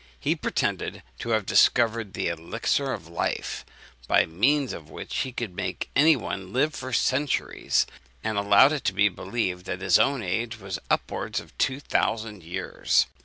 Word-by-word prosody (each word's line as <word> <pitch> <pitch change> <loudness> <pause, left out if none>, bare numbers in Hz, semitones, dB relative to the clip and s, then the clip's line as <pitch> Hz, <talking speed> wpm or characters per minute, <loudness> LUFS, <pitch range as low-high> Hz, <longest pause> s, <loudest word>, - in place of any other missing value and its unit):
He - - +1
pretended - - -2 0.2
to 120 - -5
have 110 -3 +1
discovered 115 -3 +3
the - - -1
elixir 110 - -1
of 80 - -5
life, 85 0 -3 0.4
by - - +4
means 130 - +1
of 80 -2 -9
which - - -6
he 130 - -1
could 115 -7 -5
make 90 -2 -4
any 155 +4 +6
one 95 -6 -5
live 150 +6 +1
for 130 -1 -6
centuries; 130 +3 +1 0.4
and 110 0 -1
allowed 100 +6 +6
it 150 - -3
to 105 +2 +3
believed 95 -1 -3
that 90 - -3
his - - +4
own 135 -4 +2
age 110 +5 -2
was 95 -2 -5
upwards - - -1
of - - -14
two 130 +1 +1
thousand 110 -7 -1
years. 90 +3 +1
110 Hz, 165 wpm, -26 LUFS, 95-130 Hz, 0.4 s, any